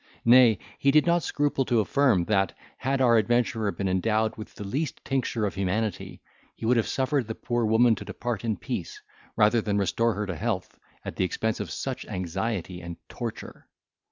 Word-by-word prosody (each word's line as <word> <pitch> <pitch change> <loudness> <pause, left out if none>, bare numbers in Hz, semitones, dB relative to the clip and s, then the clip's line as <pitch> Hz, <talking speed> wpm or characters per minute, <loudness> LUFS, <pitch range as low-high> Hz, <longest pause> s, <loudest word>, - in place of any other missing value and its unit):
Nay, 120 -2 +7 0.2
he 140 - +3
did 150 +2 +5
not 170 0 +3
scruple 145 -3 0
to 120 -2 +2
affirm, 110 -5 +2
that, 95 -2 +1 0.2
had 135 +1 -1
our 120 -2 +5
adventurer 110 -1 +1
been 100 - -3
endowed 110 +4 +1
with 110 - -10
the - - -7
least 135 +10 -3
tincture 125 -4 -1
of 100 - -2
humanity, 100 +1 -2 0.3
he - - -7
would 120 +2 +3
have 115 - +1
suffered 135 -2 0
the 110 - -4
poor 120 -1 -1
woman 115 +2 +5
to - - -5
depart 120 -3 -4
in 110 -4 -1
peace, - - -5 0.4
rather 110 +1 +4
than 105 -1 -1
restore 115 +3 +1
her 105 +1 -2
to 95 -3 -4
health, - - -3 0.3
at - - -6
the - - +1
expense 110 +4 -1
of - - -4
such 135 -2 -4
anxiety 95 -1 -3
and 85 0 -7
torture. - - -7
110 Hz, 185 wpm, -26 LUFS, 100-125 Hz, 0.4 s, Nay